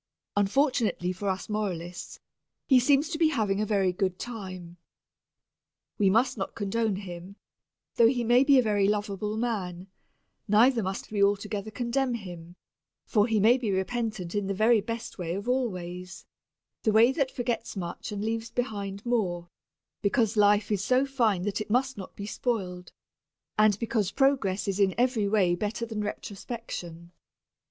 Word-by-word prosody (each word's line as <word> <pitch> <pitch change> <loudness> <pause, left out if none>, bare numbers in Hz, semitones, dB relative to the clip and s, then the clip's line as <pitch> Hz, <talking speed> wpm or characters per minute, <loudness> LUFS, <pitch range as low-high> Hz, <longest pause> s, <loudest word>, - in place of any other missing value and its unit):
Unfortunately 205 - +1
for 195 +2 -3
us 190 0 -3
moralists 180 -5 -4 0.5
he 260 -2 +6
seems 285 +3 +3
to 320 -2 -4
be 325 - +5
having 210 -8 0
a 215 - -1
very 195 -3 +2
good 185 -1 -1
time. 185 -7 -7 1.2
We 200 -2 +4
must 230 +3 +2
not 195 - -4
condone 215 0 0
him, 185 0 -8 0.6
though 230 - +7
he 245 0 +1
may 240 +3 +5
be 275 -1 +5
a 255 - +5
very 205 -3 +2
lovable 210 +1 -1
person; 190 -6 -3 0.6
neither 230 +4 +5
must 190 +1 -4
we 205 -2 +2
altogether 205 +1 0
condemn 245 +2 -1
him, 175 -5 -9 0.5
for 210 -2 +2
he 225 -2 +2
may 235 +6 +5
be 230 -4 -2
repentant 195 -2 -2
in 205 -2 -1
the 195 - -1
very 220 +2 +4
best 230 0 -6
way 170 -1 -2
of 200 +4 -5
all 250 -1 +1
ways, 180 0 -8 0.6
the 220 - +2
way 225 +4 +6
that 275 -2 0
forgets 240 -3 -3
much 175 +3 -5
and 205 0 -3
leaves 225 0 -2
behind 205 -4 -4
more, 180 -8 -1 0.5
because 220 +1 +1
life 205 0 +4
is 200 -2 0
so 255 +4 +3
fine 230 -9 +1
that 205 +1 -2
it 215 - -6
must 260 +4 +1
not 195 - -9
be 200 - -6
spoiled, 185 -6 -3 0.6
and 215 -2 +4
because 220 -3 0
progress 265 -9 +1
is 195 0 -1
in 195 -2 +3
every 240 -4 +2
way 195 -4 +3
better 210 +5 -2
than 220 -2 -4
retrospection. 195 -5 -6
210 Hz, 160 wpm, -28 LUFS, 190-235 Hz, 1.2 s, though